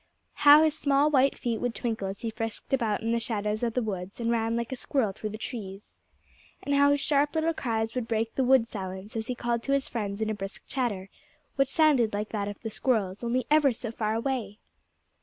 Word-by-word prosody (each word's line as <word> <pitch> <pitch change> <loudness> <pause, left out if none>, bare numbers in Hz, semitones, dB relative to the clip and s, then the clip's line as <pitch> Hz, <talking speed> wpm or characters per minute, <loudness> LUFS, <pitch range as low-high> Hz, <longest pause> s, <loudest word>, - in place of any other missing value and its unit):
How 295 +1 +7
his 310 -1 +2
small 285 0 +2
white 275 -1 +3
feet 230 -3 -2
would 245 -1 -1
twinkle 225 -5 -2
as 195 +1 -6
he 230 - -3
frisked 225 +3 -5
about 230 -5 +1
in 225 - 0
the 235 - +2
shadows 215 -2 -2
of 235 -2 -1
the 250 - +1
woods 195 -2 -5
and 230 0 0
ran 225 0 0
like 235 +1 -3
a - - -2
squirrel 250 -4 0
through 215 +2 -5
the 215 - -6
trees! 210 -4 -7 0.7
And 285 - -1
how 285 0 +5
his 285 0 +3
sharp 290 +1 +1
little 320 +1 +1
cries 225 -6 -2
would 250 -3 -3
break 225 0 -1
the 265 - +1
wood 255 -2 +4
silence 190 0 -7
as 225 0 -3
he 250 - -2
called 235 -1 -1
to 275 - -1
his 275 -1 +1
friends 205 -3 -3
in 220 0 0
a - - 0
brisk 195 -1 -6
chatter, 205 -8 -2 0.4
which 275 -1 +2
sounded 275 -9 +3
like 210 +1 -3
that 205 -2 -2
of 205 -1 -6
the 225 - -5
squirrels, 210 -5 0
only 245 +2 0
ever 300 -3 +5
so 230 0 -5
far 220 -2 -1
away! 230 -4 -2
230 Hz, 230 wpm, -28 LUFS, 215-265 Hz, 0.7 s, How